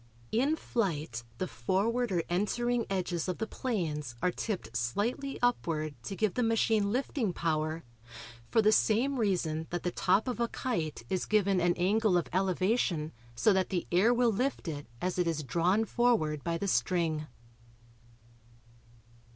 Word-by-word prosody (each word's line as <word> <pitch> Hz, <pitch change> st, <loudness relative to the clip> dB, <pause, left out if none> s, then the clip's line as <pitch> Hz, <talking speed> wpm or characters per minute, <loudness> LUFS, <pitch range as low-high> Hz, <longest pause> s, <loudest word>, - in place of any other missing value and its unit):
In 270 Hz, +8 st, +2 dB
flight 155 Hz, -, -2 dB
the 185 Hz, -, -1 dB
forward 195 Hz, -, 0 dB
or 175 Hz, -3 st, +1 dB
entering 235 Hz, +6 st, 0 dB
edges 180 Hz, -3 st, -1 dB
of 185 Hz, -, -2 dB
the 220 Hz, -, -2 dB
planes 155 Hz, -, -3 dB
are 180 Hz, -, +1 dB
tipped 175 Hz, -, -4 dB
slightly 210 Hz, -, -1 dB
upward 160 Hz, -11 st, 0 dB
to 195 Hz, -, -4 dB
give 215 Hz, -2 st, +1 dB
the 250 Hz, -, 0 dB
machine 225 Hz, -3 st, +2 dB
lifting 245 Hz, -4 st, -1 dB
power 160 Hz, -1 st, -1 dB, 0.7 s
for 225 Hz, -, +3 dB
the 215 Hz, -, +5 dB
same 245 Hz, +6 st, +2 dB
reason 165 Hz, -7 st, 0 dB
that 175 Hz, -, -3 dB
the 180 Hz, -, 0 dB
top 190 Hz, +7 st, +2 dB
of 250 Hz, -2 st, -2 dB
a 235 Hz, -, +2 dB
kite 165 Hz, -, -3 dB
is 185 Hz, -, -1 dB
given 200 Hz, -3 st, +3 dB
an 175 Hz, 0 st, +3 dB
angle 200 Hz, +1 st, +2 dB
of 175 Hz, -, -1 dB
elevation 185 Hz, -3 st, +1 dB, 0.2 s
so 200 Hz, -, +4 dB
that 190 Hz, -1 st, +1 dB
the 180 Hz, -3 st, -1 dB
air 190 Hz, +7 st, +5 dB
will 245 Hz, -1 st, +3 dB
lift 250 Hz, 0 st, -1 dB
it 145 Hz, -4 st, -5 dB
as 180 Hz, 0 st, -2 dB
it 175 Hz, -, +2 dB
is 160 Hz, -2 st, -1 dB
drawn 175 Hz, -, +2 dB
forward 220 Hz, -, +1 dB
by 170 Hz, -1 st, -1 dB
the 200 Hz, -, -3 dB
string. 155 Hz, +2 st, +1 dB
185 Hz, 160 wpm, -31 LUFS, 165-225 Hz, 0.7 s, the